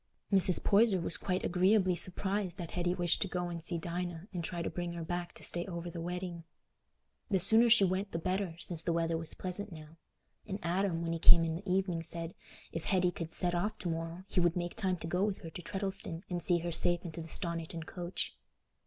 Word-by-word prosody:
Mrs. 185 -2 +5
Poyser 205 -2 +4
was 170 - +3
quite 185 -1 -2
agreeably 185 +1 +3
surprised 190 +1 0
that 170 -4 -6
Hetty 175 0 -1
wished 175 -2 +2
to 195 - +1
go 180 -1 -3
and 170 -1 -6
see 170 0 -1
Dinah 175 +2 -5
and 175 -2 -3
try 170 +1 -3
to - - -2
bring 175 -1 -4
her 170 -1 -5
back 175 +1 -4
to - - -10
stay 175 - +1
over 170 -1 -5
the 170 - -6
wedding. 175 0 -5 0.9
The 195 - +2
sooner 220 +6 +7
she 225 -3 +7
went 190 +2 0
the - - -2
better, 185 0 -2
since 170 -1 -4
the 170 - -1
weather 165 0 0
was 160 -1 -6
pleasant 190 +3 -1
now; 155 0 -12 0.5
and 195 -2 -3
Adam, 175 -1 0
when 165 0 -2
he 165 - -3
came 165 +1 +7
in 165 -1 -1
the 180 +3 -5
evening, 185 -3 0
said, 165 +1 +1 0.4
if 165 - -5
Hetty 180 -2 +2
could 165 -2 -6
set 175 +1 +4
off 195 +5 -1
to 180 - -4
morrow, 165 +2 -4
he - - 0
would 175 -1 +2
make 175 -1 -3
time 190 -4 -1
to 165 - -5
go 180 +3 0
with 205 -2 -1
her 165 - -7
to 180 - -7
Treddleston 190 -3 -4
and 175 -1 -2
see 175 +1 +3
her 170 0 -3
safe 175 +1 +4
into 165 0 -5
the 160 - -9
Stoniton 165 -2 -1
coach. 175 +1 -3
175 Hz, 225 wpm, -32 LUFS, 170-185 Hz, 0.9 s, sooner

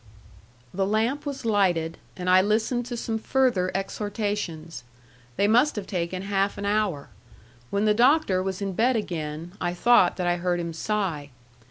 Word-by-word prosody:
The 195 +1 0
lamp 230 +8 0
was 275 -4 -5
lighted, 180 -7 +1 0.2
and 180 -1 -5
I 185 +1 +6
listened 225 +4 0
to 240 -1 -4
some 225 -1 -2
further 240 -7 +1
exhortations. 195 - -3 0.5
They 200 - +3
must 245 +8 +4
have 205 -3 -4
taken 185 0 -3
half 195 0 0
an 200 - -4
hour. 200 -8 0 0.6
When 200 +1 0
the 210 - +4
Doctor 240 -4 +3
was 190 +1 -3
in 195 -1 -2
bed 240 +6 +2
again, 165 -5 -4
I 175 0 -1
thought 210 -2 +4
that 180 - -1
I 175 0 +1
heard 175 0 -1
him 170 -1 -4
sigh. 165 -5 -2
195 Hz, 165 wpm, -25 LUFS, 175-220 Hz, 0.6 s, I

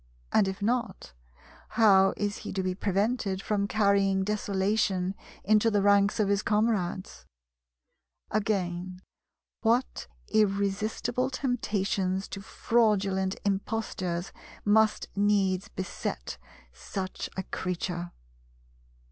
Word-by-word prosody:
And 195 - +4
if 190 +1 -4
not, 235 - -1 0.6
how 195 -4 +6
is 205 0 -1
he - - -7
to 190 0 -1
be 185 0 0
prevented 200 +1 0
from 200 0 -1
carrying 200 -2 +2
desolation 195 -2 0 0.3
into 215 +1 +4
the 205 -2 +1
ranks 200 +1 +4
of 210 - +3
his 200 0 +2
comrades? 210 -4 -1 1.0
Again, 185 -3 -2 0.6
what 235 +3 +1 0.2
irresistible 215 +4 0
temptations 205 -7 -1
to 195 - -6
fraudulent 195 -4 +1
impostures 195 -3 -2 0.3
must 215 +1 +3
needs 200 -2 +2
beset 120 - -5 0.3
such 185 - -5
a 190 - -1
creature! 175 -1 -3
200 Hz, 95 wpm, -28 LUFS, 190-215 Hz, 1.0 s, how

